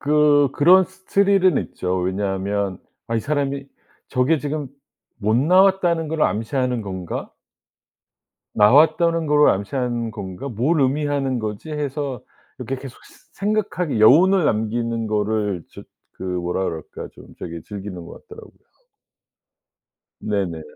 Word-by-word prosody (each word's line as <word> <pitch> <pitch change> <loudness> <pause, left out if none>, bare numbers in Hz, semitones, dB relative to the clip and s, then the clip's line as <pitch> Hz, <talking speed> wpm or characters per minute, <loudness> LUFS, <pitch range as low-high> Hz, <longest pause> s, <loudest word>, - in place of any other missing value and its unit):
그 145 -1 +4
그런 180 +5 +6
스 190 +1 -21
스릴은 195 -4 +3
있죠. 90 +1 -3
왜냐하면 95 +1 -2 0.3
아 115 - 0
'이 - - 0
사람이 140 -1 -2 0.4
저게 140 +4 +1
지금 145 -1 -4 0.5
못 110 +1 +1
나왔다는 180 +1 +3
걸 155 0 -2
암시하는 120 +4 0
건가?' 95 -3 -5 1.3
'나왔다는 155 +8 +4
걸 150 0 +4
암시하는 120 +3 -2
건가? 100 +4 -7
뭘 135 +8 0
의미하는 135 -1 0
거지?' 110 +7 -5
해서 145 -4 -4 0.4
이렇게 135 - -4
계속 135 -3 -10
스 - - -21
생각하게 200 - -1
여운을 175 - +6
남기는 115 0 -1
거를 105 -3 -1
저 - - -11 0.4
그 - - -9
뭐라 90 0 -2
그럴까 80 -3 -6
좀 - - -15
저기 85 -1 -7
즐기는 100 -3 -8
것 - - -13
같더라고요. 440 0 -13 1.6
네네. 95 -6 -2
130 Hz, 270 characters per minute, -21 LUFS, 105-155 Hz, 1.6 s, 그런